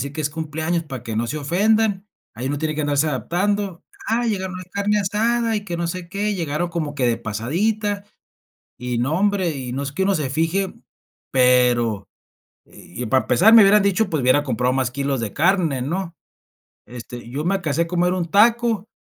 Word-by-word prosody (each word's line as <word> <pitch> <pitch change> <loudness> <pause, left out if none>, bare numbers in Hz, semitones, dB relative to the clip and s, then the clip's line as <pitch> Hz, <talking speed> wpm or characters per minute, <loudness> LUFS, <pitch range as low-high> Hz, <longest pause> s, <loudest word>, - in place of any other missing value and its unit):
decir 140 +1 -5
que 155 - -5
es 150 - 0
cumpleaños 160 +2 -2
para 130 -6 -7
que 115 -2 -5
no 115 +2 0
se 150 +6 -3
ofendan, 200 +6 +1 0.3
ahí 125 +4 -5
uno 145 0 -2
tiene 155 0 -2
que 155 - -2
andarse 145 +1 +1
adaptando. 180 - -1 0.2
Ah, 235 +2 0
llegaron 190 -4 -2
a - - -6
la 185 - -8
carne 205 +1 0
asada 225 +3 0
y 205 - -4
que 175 -4 -4
no 170 - -1
sé 170 0 -5
qué, 205 +1 -1
llegaron 165 0 -2
como 155 -4 -3
que 130 -4 0
de 115 - +2
pasadita, 195 - -2 0.7
y 125 -1 -3
no 135 +6 0
hombre, 195 -6 +1
y 125 -2 -5
no 135 +2 -3
es 140 - -5
que 170 - -2
uno 195 +1 +2
se 150 -6 -1
fije, 165 +7 -1 0.6
pero 125 -5 +3 0.6
y 120 +7 -9
para 130 +4 +2
empezar 215 +6 +5
me 225 - +10
hubieran 200 +1 +6
dicho 200 +1 +1
pues 155 -5 -1
hubiera 130 +4 +3
comprado 125 -1 0
más 130 -2 0
kilos 140 -1 -2
de 105 -4 -4
carne, 165 -5 +1
¿no? 170 +4 -3 0.7
Este, 120 0 -9
yo 145 +4 -3
me 190 - +1
alcancé 170 -4 0
a - - -2
comer 180 +1 +1
un 175 -3 -2
taco 225 0 +3
165 Hz, 200 wpm, -21 LUFS, 130-200 Hz, 0.7 s, me